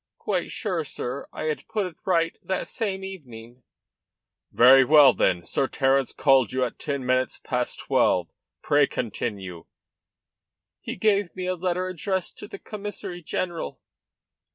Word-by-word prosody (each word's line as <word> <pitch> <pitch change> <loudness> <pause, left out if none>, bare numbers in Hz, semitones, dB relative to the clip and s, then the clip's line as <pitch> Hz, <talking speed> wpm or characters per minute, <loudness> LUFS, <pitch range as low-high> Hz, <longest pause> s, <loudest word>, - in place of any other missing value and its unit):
"Quite - - -2
sure, 185 -8 -2
sir; 140 -1 -5
I - - -6
had 155 -1 -3
put 215 -3 -1
it 180 -3 -7
right 165 -3 +1
that 190 -1 -3
same 195 -5 -3
evening." 125 -10 -10 0.9
"Very 130 +3 +7
well, 145 -1 +7
then. 90 -1 +1
Sir 135 +10 0
Terence 135 -1 +1
called 135 -6 +3
you 130 0 0
at 120 - -7
ten 140 -3 -3
minutes 130 +1 +1
past 125 -2 -2
twelve. 90 -2 +2 0.4
Pray 145 -1 +4
continue." 100 -6 -4 1.1
"He - - -6
gave 200 -2 +1
me 185 -1 -4
a 185 - 0
letter 180 +1 -1
addressed 185 +1 -3
to - - -8
the - - -8
Commissary 205 -3 -7
general. 170 - -4
150 Hz, 145 wpm, -25 LUFS, 125-185 Hz, 1.1 s, Very